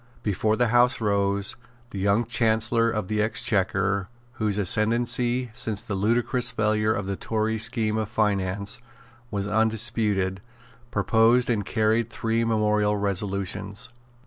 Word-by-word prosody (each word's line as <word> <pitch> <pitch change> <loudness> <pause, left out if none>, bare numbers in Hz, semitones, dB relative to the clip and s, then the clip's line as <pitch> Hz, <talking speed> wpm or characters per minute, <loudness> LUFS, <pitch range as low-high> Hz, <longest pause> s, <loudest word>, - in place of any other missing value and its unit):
Before 105 +1 0
the 120 0 +1
House 120 +2 +3
rose 100 -2 0 0.4
the 100 - -5
young 100 +4 +2
Chancellor 115 0 +2
of 105 -4 -3
the 105 +1 0
Exchequer, 100 -3 0 0.2
whose 110 -4 -2
ascendency, 120 +4 +1
since 115 -4 -3
the 100 - -5
ludicrous 120 +5 +1
failure 110 -2 +1
of 100 -2 -2
the 100 0 -3
Tory 110 +2 -2
scheme 110 -1 +1
of 110 -2 -2
finance, 100 -3 -1 0.5
was 100 -3 -3
undisputed, 105 -3 0 0.5
proposed 115 +4 +3
and 105 -3 0
carried 110 +2 0
three 115 +1 -1
memorable 105 -2 +1
resolutions. 100 +2 -2
110 Hz, 125 wpm, -25 LUFS, 100-115 Hz, 0.5 s, House